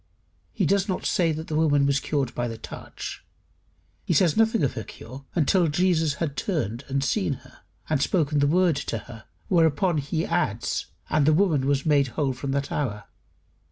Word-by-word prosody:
He -, -, 0 dB
does 200 Hz, 0 st, +2 dB
not 185 Hz, -, -2 dB
say 170 Hz, -3 st, +2 dB
that 160 Hz, +1 st, -4 dB
the -, -, -5 dB
woman 145 Hz, -3 st, +3 dB
was 140 Hz, 0 st, +2 dB
cured 135 Hz, -3 st, -1 dB
by 120 Hz, -, -2 dB
the 115 Hz, -1 st, -6 dB
touch; -, -, -8 dB, 0.8 s
he -, -, 0 dB
says 175 Hz, -6 st, +4 dB
nothing 225 Hz, -4 st, +3 dB
of 135 Hz, -, +1 dB
her 110 Hz, -, -5 dB
cure 130 Hz, +6 st, -11 dB
until 170 Hz, +2 st, +3 dB
Jesus 160 Hz, -2 st, +2 dB
had 150 Hz, -4 st, -3 dB
turned 135 Hz, -, -2 dB
and 135 Hz, 0 st, -1 dB
seen 185 Hz, 0 st, 0 dB
her, -, -, -18 dB, 0.3 s
and 150 Hz, -3 st, 0 dB
spoken 150 Hz, -4 st, +1 dB
the 145 Hz, -, +3 dB
word 175 Hz, -1 st, +3 dB
to 130 Hz, -5 st, -3 dB
her, 110 Hz, +1 st, -11 dB, 0.2 s
whereupon 165 Hz, -1 st, +2 dB
he 155 Hz, +4 st, -2 dB
adds: 120 Hz, -, -1 dB, 0.2 s
"And 150 Hz, -2 st, +3 dB
the 155 Hz, -, +6 dB
woman 155 Hz, -6 st, +2 dB
was 140 Hz, -1 st, +1 dB
made 145 Hz, -3 st, +3 dB
whole 140 Hz, -4 st, +1 dB
from 135 Hz, +2 st, -6 dB
that 140 Hz, +1 st, -1 dB
hour." 105 Hz, -8 st, -2 dB
145 Hz, 190 wpm, -25 LUFS, 135-170 Hz, 0.8 s, the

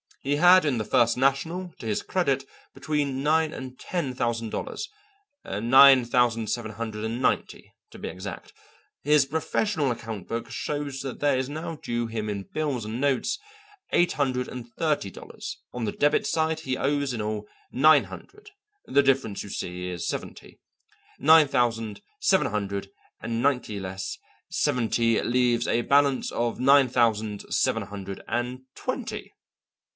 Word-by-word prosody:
He 140 Hz, +2 st, +1 dB
had 180 Hz, +2 st, +7 dB
in 130 Hz, -6 st, +1 dB
the -, -, -1 dB
First 120 Hz, +2 st, +3 dB
National 160 Hz, +7 st, 0 dB
to -, -, -9 dB
his 105 Hz, -, 0 dB
credit 140 Hz, -8 st, 0 dB, 0.3 s
between 145 Hz, -3 st, -1 dB
nine 155 Hz, +1 st, +2 dB
and 130 Hz, -1 st, -8 dB
ten 160 Hz, -8 st, -3 dB
thousand 115 Hz, -2 st, -1 dB
dollars; 425 Hz, -, -4 dB, 0.6 s
nine 130 Hz, +5 st, +6 dB
thousand 120 Hz, -2 st, +2 dB
seven 110 Hz, 0 st, -3 dB
hundred 110 Hz, -1 st, -5 dB
and 115 Hz, +3 st, -3 dB
ninety, -, -, -1 dB, 0.2 s
to -, -, -12 dB
be -, -, -5 dB
exact. 95 Hz, -1 st, -8 dB, 0.5 s
His 150 Hz, 0 st, +4 dB
professional 160 Hz, +1 st, 0 dB
account 110 Hz, -5 st, -6 dB
book 115 Hz, 0 st, -4 dB
shows 140 Hz, +3 st, -4 dB
that 135 Hz, -2 st, -6 dB
there 145 Hz, -2 st, +2 dB
is 130 Hz, +1 st, -2 dB
now 160 Hz, +2 st, -5 dB
due 120 Hz, -5 st, -3 dB
him 110 Hz, -2 st, -4 dB
in 100 Hz, -1 st, -3 dB
bills 140 Hz, -3 st, -3 dB
and 110 Hz, +4 st, -4 dB
notes 140 Hz, -, +1 dB, 0.5 s
eight 175 Hz, -, +3 dB
hundred 130 Hz, -3 st, 0 dB
and 120 Hz, -2 st, -8 dB
thirty 150 Hz, -11 st, 0 dB
dollars; -, -, -8 dB
on 125 Hz, -2 st, -3 dB
the 105 Hz, -, -1 dB
debit 145 Hz, +6 st, +2 dB
side 160 Hz, 0 st, 0 dB
he 130 Hz, -4 st, -2 dB
owes 140 Hz, -1 st, 0 dB
in 115 Hz, -, -3 dB
all 105 Hz, 0 st, -3 dB, 0.2 s
nine 145 Hz, -2 st, +5 dB
hundred; 415 Hz, -, -12 dB, 0.3 s
the 140 Hz, -, +3 dB
difference, 135 Hz, -6 st, +1 dB
you 100 Hz, -, -9 dB
see, 90 Hz, -1 st, -4 dB
is 90 Hz, -1 st, -4 dB
seventy. -, -, -6 dB, 0.6 s
Nine 155 Hz, +1 st, +7 dB
thousand 115 Hz, -5 st, 0 dB, 0.2 s
seven 190 Hz, -, +3 dB
hundred 100 Hz, -1 st, -3 dB, 0.3 s
and 115 Hz, 0 st, -2 dB
ninety 125 Hz, -6 st, 0 dB
less 95 Hz, 0 st, -5 dB, 0.3 s
seventy 115 Hz, -1 st, +1 dB
leaves 120 Hz, -1 st, +1 dB
a 120 Hz, -, +2 dB
balance 140 Hz, +1 st, +2 dB
of 120 Hz, -1 st, -1 dB
nine 135 Hz, 0 st, +5 dB
thousand 110 Hz, -4 st, 0 dB
seven 115 Hz, -, +1 dB
hundred 100 Hz, -1 st, -7 dB
and 125 Hz, +2 st, -2 dB
twenty. -, -, -5 dB
125 Hz, 155 wpm, -26 LUFS, 110-145 Hz, 0.6 s, had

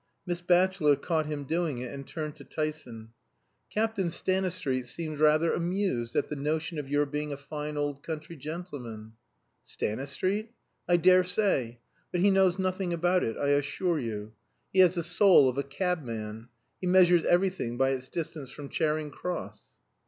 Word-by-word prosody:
Miss 175 Hz, -1 st, -3 dB
Batchelor 175 Hz, -3 st, +4 dB
caught 155 Hz, +2 st, -1 dB
him 150 Hz, -2 st, -3 dB
doing 160 Hz, -1 st, -1 dB
it 125 Hz, 0 st, -5 dB
and 140 Hz, -1 st, -8 dB
turned 155 Hz, -2 st, -5 dB
to -, -, -11 dB
Tyson. 150 Hz, -8 st, -5 dB, 0.6 s
"Captain 215 Hz, -4 st, 0 dB
Stanistreet 180 Hz, -9 st, -1 dB
seemed 155 Hz, +2 st, -5 dB
rather 155 Hz, +2 st, +4 dB
amused 170 Hz, -10 st, -1 dB
at -, -, +1 dB
the 150 Hz, -, -4 dB
notion 155 Hz, +3 st, -2 dB
of 140 Hz, -2 st, -6 dB
your 145 Hz, +1 st, +2 dB
being 150 Hz, +1 st, -3 dB
a 140 Hz, -, -4 dB
fine 150 Hz, +1 st, -6 dB
old 145 Hz, -1 st, -2 dB
country 160 Hz, +1 st, -6 dB
gentleman." 140 Hz, -8 st, -7 dB, 0.5 s
"Stanistreet? 185 Hz, -, -2 dB, 0.3 s
I 175 Hz, -, +5 dB
daresay. 180 Hz, -, +3 dB, 0.3 s
But 175 Hz, -, 0 dB
he 200 Hz, +1 st, +5 dB
knows 190 Hz, -2 st, +4 dB
nothing 185 Hz, -1 st, -1 dB
about 175 Hz, +2 st, +2 dB
it, 115 Hz, -, -2 dB
I 140 Hz, -, 0 dB
assure 145 Hz, +4 st, +1 dB
you. 110 Hz, -3 st, -5 dB, 0.4 s
He 190 Hz, -, +2 dB
has 185 Hz, -1 st, +6 dB
the 170 Hz, -, -1 dB
soul 180 Hz, -4 st, +6 dB
of 130 Hz, +2 st, -1 dB
a -, -, 0 dB
cabman. 125 Hz, -, -3 dB, 0.3 s
He 185 Hz, -, -3 dB
measures 180 Hz, -2 st, +5 dB
everything 175 Hz, -10 st, +1 dB
by 135 Hz, +1 st, +3 dB
its 130 Hz, -1 st, -3 dB
distance 160 Hz, -4 st, -5 dB
from 140 Hz, +1 st, -9 dB
Charing 155 Hz, -1 st, -1 dB
Cross." 180 Hz, +4 st, -6 dB
155 Hz, 160 wpm, -29 LUFS, 140-180 Hz, 0.6 s, has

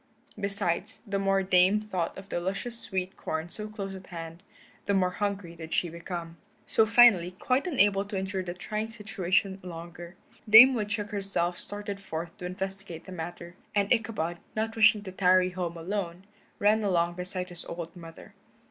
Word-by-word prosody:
Besides, 200 Hz, 0 st, -1 dB
the 200 Hz, -2 st, -1 dB
more 195 Hz, 0 st, +2 dB
the 190 Hz, -, -11 dB
Dame 185 Hz, +3 st, +5 dB
thought 190 Hz, -5 st, -3 dB
of 195 Hz, 0 st, -9 dB
the -, -, -1 dB
luscious 195 Hz, +6 st, -3 dB
sweet 190 Hz, -4 st, -3 dB
corn 160 Hz, +2 st, -4 dB
so 210 Hz, +4 st, -6 dB
close 200 Hz, -2 st, -6 dB
at 190 Hz, -1 st, -10 dB
hand, 165 Hz, -1 st, -8 dB, 0.5 s
the 200 Hz, -, +2 dB
more 185 Hz, -1 st, +2 dB
hungry 200 Hz, -3 st, -3 dB
did 160 Hz, -1 st, -5 dB
she 175 Hz, -, +1 dB
become. 170 Hz, 0 st, -6 dB, 0.3 s
So 220 Hz, -, +3 dB
finally, 205 Hz, -7 st, +6 dB
quite 260 Hz, -, +1 dB
unable 205 Hz, -, +3 dB
to 200 Hz, -1 st, -4 dB
endure 190 Hz, 0 st, -2 dB
the 175 Hz, -1 st, -5 dB
trying 215 Hz, +4 st, -3 dB
situation 195 Hz, -3 st, -1 dB
longer, 175 Hz, 0 st, -9 dB, 0.3 s
Dame 240 Hz, +5 st, +11 dB
Woodchuck 210 Hz, -2 st, -2 dB
herself 195 Hz, -4 st, -1 dB
started 205 Hz, -1 st, -5 dB
forth 170 Hz, -2 st, -6 dB
to 180 Hz, -, -6 dB
investigate 190 Hz, -2 st, -6 dB
the 185 Hz, -, -10 dB
matter. 175 Hz, 0 st, -7 dB, 0.2 s
And 200 Hz, +2 st, +3 dB
Ichabod, 205 Hz, -8 st, -1 dB, 0.2 s
not 225 Hz, +1 st, -1 dB
wishing 215 Hz, -1 st, +5 dB
to 190 Hz, -, -7 dB
tarry 185 Hz, 0 st, +4 dB
home 175 Hz, -2 st, -4 dB
alone, 180 Hz, 0 st, -4 dB, 0.3 s
ran 215 Hz, +2 st, +3 dB
along 175 Hz, -3 st, +2 dB
beside 180 Hz, +1 st, -5 dB
his 175 Hz, -1 st, -9 dB
old 170 Hz, 0 st, -6 dB
mother. 165 Hz, -2 st, -12 dB
190 Hz, 175 wpm, -28 LUFS, 175-205 Hz, 0.5 s, Dame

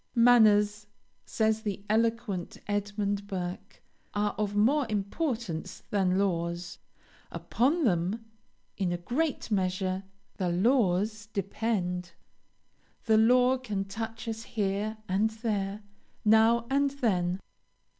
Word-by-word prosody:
"Manners," 210 Hz, -3 st, +5 dB, 0.4 s
says 220 Hz, 0 st, +1 dB
the 205 Hz, -2 st, -4 dB
eloquent 225 Hz, -4 st, 0 dB
Edmund 205 Hz, 0 st, -2 dB
Burke, 185 Hz, 0 st, -6 dB, 0.3 s
"are 205 Hz, 0 st, +1 dB
of 205 Hz, -1 st, -2 dB
more 255 Hz, +6 st, +3 dB
importance 215 Hz, -, -3 dB
than 190 Hz, -2 st, +2 dB
laws. 170 Hz, -2 st, -1 dB, 0.5 s
Upon 295 Hz, +8 st, +1 dB
them, 195 Hz, -, 0 dB, 0.5 s
in 185 Hz, -3 st, 0 dB
a 175 Hz, -, -1 dB
great 255 Hz, -, -2 dB
measure, 185 Hz, -1 st, 0 dB, 0.4 s
the 185 Hz, -3 st, 0 dB
laws 205 Hz, +1 st, +1 dB
depend. 195 Hz, -3 st, -2 dB, 0.9 s
The 220 Hz, -2 st, +4 dB
law 250 Hz, +3 st, +4 dB
can 205 Hz, -6 st, -3 dB
touch 225 Hz, +3 st, -6 dB
us 225 Hz, 0 st, -3 dB
here 210 Hz, 0 st, -2 dB
and 200 Hz, +4 st, +2 dB
there, 210 Hz, -2 st, -3 dB, 0.4 s
now 225 Hz, +2 st, +5 dB
and 280 Hz, +1 st, +3 dB
then. 190 Hz, -10 st, 0 dB
210 Hz, 105 wpm, -29 LUFS, 190-230 Hz, 0.9 s, Manners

